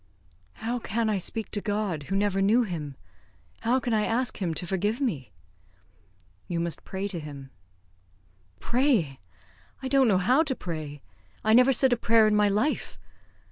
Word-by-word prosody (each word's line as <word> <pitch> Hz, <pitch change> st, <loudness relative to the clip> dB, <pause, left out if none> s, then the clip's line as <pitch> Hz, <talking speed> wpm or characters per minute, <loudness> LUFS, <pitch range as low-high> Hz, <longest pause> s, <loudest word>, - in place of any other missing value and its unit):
"How 235 Hz, -, -3 dB
can 225 Hz, 0 st, -1 dB
I 200 Hz, -, 0 dB
speak 220 Hz, +4 st, -2 dB
to 205 Hz, -, -1 dB
God, 205 Hz, -8 st, -2 dB
who 195 Hz, -, -1 dB
never 195 Hz, -1 st, +1 dB
knew 220 Hz, +5 st, +4 dB
Him? 155 Hz, -, -5 dB, 0.6 s
How 240 Hz, +3 st, +1 dB
can 245 Hz, -2 st, -2 dB
I 215 Hz, -1 st, +2 dB
ask 230 Hz, +2 st, -1 dB
Him 170 Hz, -4 st, -1 dB
to 180 Hz, -, -3 dB
forgive 205 Hz, +6 st, -1 dB
me?" 175 Hz, -, -2 dB, 1.2 s
"You 170 Hz, -, -2 dB
must 170 Hz, -2 st, 0 dB
pray 195 Hz, +1 st, -4 dB
to 190 Hz, -4 st, -4 dB
him." 140 Hz, -3 st, -9 dB, 1.1 s
"Pray! 235 Hz, -, +1 dB, 0.6 s
I -, -, -2 dB
don't 270 Hz, -1 st, +4 dB
know 200 Hz, -4 st, +4 dB
how 250 Hz, +11 st, +3 dB
to 285 Hz, -5 st, -1 dB
pray. 155 Hz, -, -6 dB, 0.4 s
I 220 Hz, -, +3 dB
never 250 Hz, +3 st, +6 dB
said 260 Hz, 0 st, +3 dB
a -, -, +1 dB
prayer 225 Hz, -1 st, +4 dB
in 215 Hz, 0 st, +3 dB
my 210 Hz, 0 st, +4 dB
life. 215 Hz, +10 st, -1 dB
210 Hz, 170 wpm, -27 LUFS, 175-240 Hz, 1.2 s, never